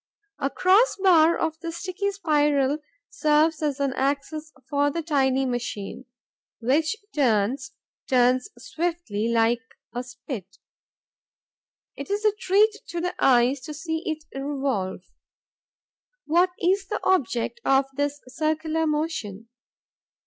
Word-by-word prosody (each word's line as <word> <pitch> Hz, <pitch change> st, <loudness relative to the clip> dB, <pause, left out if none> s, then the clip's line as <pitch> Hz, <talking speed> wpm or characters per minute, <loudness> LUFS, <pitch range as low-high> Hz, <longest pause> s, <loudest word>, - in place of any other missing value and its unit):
A 275 Hz, -, 0 dB
cross 385 Hz, -, +4 dB
bar 340 Hz, -4 st, +5 dB
of 320 Hz, -1 st, -2 dB
the 335 Hz, -1 st, -5 dB
sticky 370 Hz, +4 st, -3 dB
spiral 295 Hz, -6 st, +2 dB, 0.3 s
serves 310 Hz, +1 st, +2 dB
as 295 Hz, -2 st, -1 dB
an 275 Hz, -2 st, 0 dB
axis 285 Hz, +3 st, -2 dB, 0.2 s
for 285 Hz, -1 st, +2 dB
the 335 Hz, +3 st, -3 dB
tiny 270 Hz, -4 st, +2 dB
machine, 240 Hz, -1 st, -4 dB, 0.5 s
which 295 Hz, -, +1 dB, 0.2 s
turns, 265 Hz, +1 st, +1 dB, 0.4 s
turns 255 Hz, +5 st, +3 dB
swiftly, 330 Hz, -11 st, -2 dB
like 230 Hz, +1 st, +2 dB, 0.3 s
a 245 Hz, -, -2 dB
spit. 245 Hz, -, -8 dB, 1.4 s
It -, -, -7 dB
is 410 Hz, +2 st, -1 dB
a 425 Hz, -, +6 dB
treat 420 Hz, +2 st, +3 dB
to 345 Hz, -, -4 dB
the 360 Hz, +1 st, -2 dB
eyes 255 Hz, +1 st, +4 dB
to 305 Hz, 0 st, -7 dB
see 320 Hz, +1 st, -3 dB
it 315 Hz, -1 st, -3 dB
revolve. 270 Hz, -10 st, -2 dB, 1.2 s
What 350 Hz, +4 st, +3 dB
is 385 Hz, +2 st, +1 dB
the 420 Hz, -, -2 dB
object 365 Hz, -, 0 dB
of 270 Hz, 0 st, +4 dB
this 285 Hz, +1 st, -1 dB
circular 315 Hz, +3 st, -1 dB
motion? 265 Hz, -, -3 dB
295 Hz, 120 wpm, -25 LUFS, 255-335 Hz, 1.4 s, a